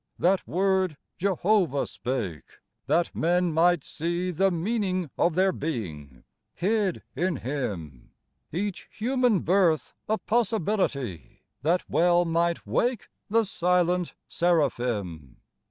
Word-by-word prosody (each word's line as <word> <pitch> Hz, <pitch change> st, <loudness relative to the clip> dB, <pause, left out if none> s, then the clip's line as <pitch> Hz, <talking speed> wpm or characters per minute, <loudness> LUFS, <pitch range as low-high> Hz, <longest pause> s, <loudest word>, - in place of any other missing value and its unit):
That 185 Hz, +1 st, +2 dB
Word 190 Hz, -3 st, +1 dB, 0.2 s
Jehovah 185 Hz, -5 st, +2 dB
spake, 105 Hz, -, -4 dB, 0.3 s
that 170 Hz, -, +1 dB
men 175 Hz, +1 st, +2 dB
might 170 Hz, -1 st, +3 dB
see 175 Hz, +3 st, -2 dB
The 195 Hz, +3 st, +2 dB
meaning 185 Hz, -, -1 dB
of 170 Hz, -2 st, +2 dB
their 190 Hz, +1 st, +4 dB
being, 85 Hz, -, -5 dB, 0.3 s
hid 200 Hz, 0 st, 0 dB
in 175 Hz, +4 st, 0 dB
Him; 100 Hz, -, -5 dB, 0.4 s
Each 195 Hz, +3 st, -3 dB
human 245 Hz, -3 st, +1 dB
birth 175 Hz, -4 st, +2 dB, 0.2 s
a 220 Hz, -, +2 dB
possibility, 190 Hz, -, -1 dB, 0.2 s
That 170 Hz, +5 st, +1 dB
well 175 Hz, +1 st, +3 dB
might 170 Hz, +1 st, 0 dB
wake 245 Hz, -3 st, 0 dB, 0.2 s
the 225 Hz, +2 st, +3 dB
silent 180 Hz, -1 st, +1 dB
seraphim. 120 Hz, -, 0 dB
175 Hz, 105 wpm, -26 LUFS, 140-190 Hz, 0.4 s, their